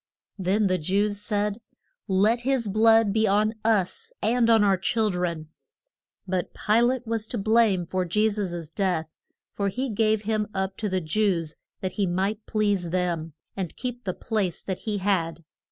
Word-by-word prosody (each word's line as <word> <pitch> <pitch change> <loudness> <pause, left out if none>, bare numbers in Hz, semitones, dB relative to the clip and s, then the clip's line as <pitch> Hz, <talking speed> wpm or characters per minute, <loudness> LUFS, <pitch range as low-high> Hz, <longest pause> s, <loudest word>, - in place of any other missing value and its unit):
Then 195 +3 +1
the 185 -1 +1
Jews 200 +5 0
said, 210 +1 -1 0.5
Let 205 +4 +3
his 250 -2 0
blood 225 0 +4
be 220 0 +2
on 210 +2 +2
us 225 - +1
and 235 0 +2
on 225 -2 +6
our 200 -1 +4
chil 215 +3 +1
dren. 170 -3 -3 0.8
But 185 -1 -2
Pi 220 +2 +2
late 250 +1 +1
was 225 -1 -2
to 240 - -4
blame 215 -3 +3
for 185 +2 -1
Je 210 +5 +2
sus' 175 -7 -3
death; 175 -5 -1 0.4
for 200 - -2
he 255 +5 -3
gave 215 0 +1
him 215 0 0
up 190 0 -1
to 210 - -2
the 185 -1 0
Jews 165 -2 0 0.3
that 185 - -2
he 195 - +2
might 195 +5 -1
please 205 -5 0
them, 170 -3 -1 0.2
and 185 -4 -4
keep 245 -1 -5
the 185 -4 -3
place 195 -6 -2
that 190 -2 -4
he 210 - 0
had. 170 -4 -1
205 Hz, 170 wpm, -25 LUFS, 185-220 Hz, 0.8 s, on